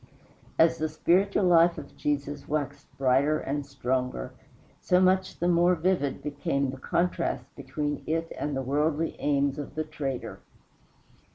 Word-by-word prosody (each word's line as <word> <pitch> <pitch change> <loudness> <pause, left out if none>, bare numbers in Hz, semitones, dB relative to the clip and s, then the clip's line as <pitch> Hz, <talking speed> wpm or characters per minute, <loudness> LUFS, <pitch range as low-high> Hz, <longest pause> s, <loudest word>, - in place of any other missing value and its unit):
As 165 0 +4
the 155 0 0
spiritual 190 +6 +2
life 170 -1 +5
of 145 -2 -9
Jesus 145 0 -2
waxed 145 -2 -3
brighter 135 +3 +3
and 145 0 -3
stronger, 125 - -2 0.5
so 180 - +3
much 185 0 +2
the 175 - 0
more 175 +1 +4
vivid 170 -5 0
became 140 -2 -1
the 135 - -8
contrast 170 +3 -1
between 145 -1 -3
it 165 +1 -1
and 145 -2 -2
the 135 - -2
worldly 150 +4 0
aims 140 0 +1
of 145 - -7
the 155 - -1
traitor. 140 -4 -5
150 Hz, 145 wpm, -27 LUFS, 140-170 Hz, 0.5 s, life